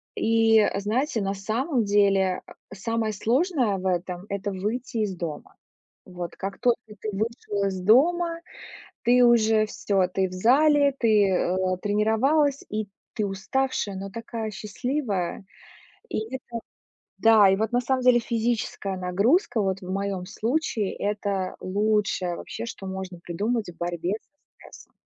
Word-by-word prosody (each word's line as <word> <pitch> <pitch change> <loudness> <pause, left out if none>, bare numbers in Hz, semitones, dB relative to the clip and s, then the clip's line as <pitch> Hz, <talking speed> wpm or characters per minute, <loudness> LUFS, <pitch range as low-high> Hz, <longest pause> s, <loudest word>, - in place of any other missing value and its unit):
и 225 -1 +4
знаете, 225 +5 0
на 195 0 -1
самом 230 - -1
деле, 195 -2 +3
а, - - -12 0.2
самое 220 +2 -2
сложное 245 - +1
в 185 - -7
этом- 180 0 -2
это 200 +1 -3
выйти 220 +6 -3
из 205 -3 -1
дома. 165 -4 -6 0.5
Вот, 180 -2 -7
как 195 0 -5
только 240 -1 +2 0.2
ты 215 - -3
вышел 210 -1 -2
из 190 -1 -3
дома, 335 - +3 0.6
ты 245 +1 +5
уже 220 -2 +4
всё, 195 -3 0
ты 190 +1 0
в - - -10
зале, 280 +8 +4
ты, 215 -4 +4
э, 180 -1 +1 0.3
тренировалась, 255 +8 +2
и 215 0 -3 0.3
ты 215 - -1
уставшая, 205 +2 -1
но 195 +1 -5
такая 230 0 -5
счастливая. 210 -2 -3 0.6
И - - -2 0.2
это 260 - -15 0.8
да, 220 -3 +7
и 190 - +4
вот 220 +2 -1
на 245 +1 +2
самом 255 +1 0
деле 250 -1 +6
физическая 230 -4 -2
нагрузка, 205 - +2
вот 195 -1 -1
в 185 0 -6
моём 195 -1 -2
случае,- 225 -1 -1
это 200 -2 -2
лучшее 200 -2 0
вообще, - - -6
что 195 - -8
можно 190 -2 -6
придумать 205 +6 -2
в 175 - -11
борьбе 175 +1 -2
со - - -41 0.3
стрессом. - - -15
210 Hz, 145 wpm, -25 LUFS, 190-235 Hz, 0.8 s, да